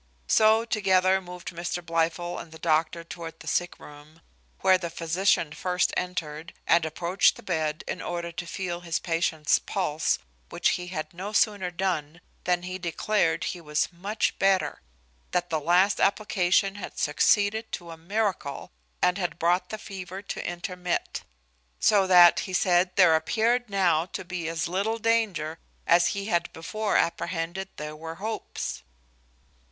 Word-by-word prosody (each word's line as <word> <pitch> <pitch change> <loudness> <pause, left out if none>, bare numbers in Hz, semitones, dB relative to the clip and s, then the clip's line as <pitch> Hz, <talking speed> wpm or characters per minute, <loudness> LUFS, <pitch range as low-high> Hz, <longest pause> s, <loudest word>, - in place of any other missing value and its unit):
So 220 +1 +4
together 190 -3 +3
moved 180 -1 -8
Mr 175 0 -4
Blifil 165 +1 -1
and 160 - -10
the 160 - -11
doctor 160 +1 +1
toward 165 -1 -8
the - - -12
sick 175 +3 -1
room; 150 +2 -14 0.4
where 190 -1 +5
the 170 -2 -4
physician 165 0 +1
first 180 +3 0
entered, 165 -3 -4
and 170 -1 +4
approached 170 +4 +2
the - - -13
bed, 155 -3 -1
in - - -4
order 170 -1 -4
to 170 +1 -6
feel 175 0 -4
his 170 -2 -2
patient's 165 -3 +1
pulse, 160 -5 0 0.3
which - - +1
he 180 0 -2
had 155 -3 -5
no 195 +4 -6
sooner 205 -4 +2
done, 175 -3 -2 0.3
than 175 -1 +1
he 185 +1 -5
declared 175 +1 0
he 175 - -4
was 150 +2 -1
much 200 +5 -2
better; 195 -1 +2 0.5
that 175 -1 0
the 160 - +1
last 180 +6 +3
application 195 -1 +2
had - - -8
succeeded 205 +8 +2
to 170 -2 -5
a - - -7
miracle, 180 -4 -2 0.3
and 180 +2 +3
had 175 -2 -2
brought 175 +2 +1
the 215 - -4
fever 195 -2 -8
to - - -5
intermit: 180 0 -3 0.6
so 200 -3 +4
that, 175 -2 +8
he - - -6
said, 180 0 +3
there 180 -4 +6
appeared 230 +8 +1
now 175 -4 +2
to 190 - -6
be 175 -2 -4
as 165 0 -2
little 200 +6 -1
danger 210 -9 0 0.3
as 170 +1 +5
he 200 - -3
had 175 -5 0
before 210 +6 -1
apprehended 170 +3 -1
there 150 0 -6
were 160 +1 -7
hopes. 215 +5 -5
175 Hz, 155 wpm, -27 LUFS, 165-195 Hz, 0.6 s, that